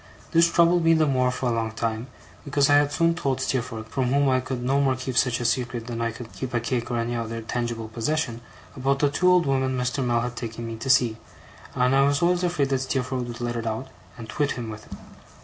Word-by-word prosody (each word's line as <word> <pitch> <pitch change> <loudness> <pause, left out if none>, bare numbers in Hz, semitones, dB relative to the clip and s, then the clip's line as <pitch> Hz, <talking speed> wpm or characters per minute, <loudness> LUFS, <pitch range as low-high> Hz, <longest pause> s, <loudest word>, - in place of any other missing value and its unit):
This 170 0 +4
troubled 170 0 +4
me 165 0 +5
the 160 -1 +3
more 130 -3 +2
for 125 0 -2
a - - 0
long 115 -1 -2
time, 115 +1 -2 0.4
because 140 0 +2
I 145 - +7
had 145 0 +2
soon 165 +3 +2
told 135 -6 -1
Steerforth, 115 -4 -2
from 130 +1 -1
whom 140 +2 +2
I 130 0 +3
could 130 -1 -4
no 135 +3 +2
more 135 -2 +2
keep 130 0 -5
such 125 -2 +2
a 120 - -3
secret, 120 -1 -1
than 115 -1 -4
I 115 - +1
could 115 0 -9
keep 130 -2 -5
a - - +3
cake 120 0 -2
or 120 - -1
any 115 +1 -1
other 115 0 -3
tangible 120 -1 -3
possession, 120 +1 -2 0.3
about 135 +1 +1
the 145 0 +2
two 180 +5 +3
old 180 -1 +4
women 130 -1 0
Mr. 125 +2 -1
Mell 120 -1 +1
had 120 0 -4
taken 115 -1 -6
me 115 0 -5
to 115 +4 -5
see; 120 -4 +4 0.6
and 125 +1 +2
I 135 - +5
was 140 +3 +2
always 175 +1 +2
afraid 170 -6 +1
that 135 -1 +1
Steerforth 130 -1 -2
would 120 0 -7
let 120 0 -2
it 115 -1 -3
out, 115 +4 -3 0.3
and 115 -2 -8
twit 145 +6 -1
him 115 -3 -5
with 105 0 -10
it. - - -7
125 Hz, 250 wpm, -25 LUFS, 115-140 Hz, 0.6 s, I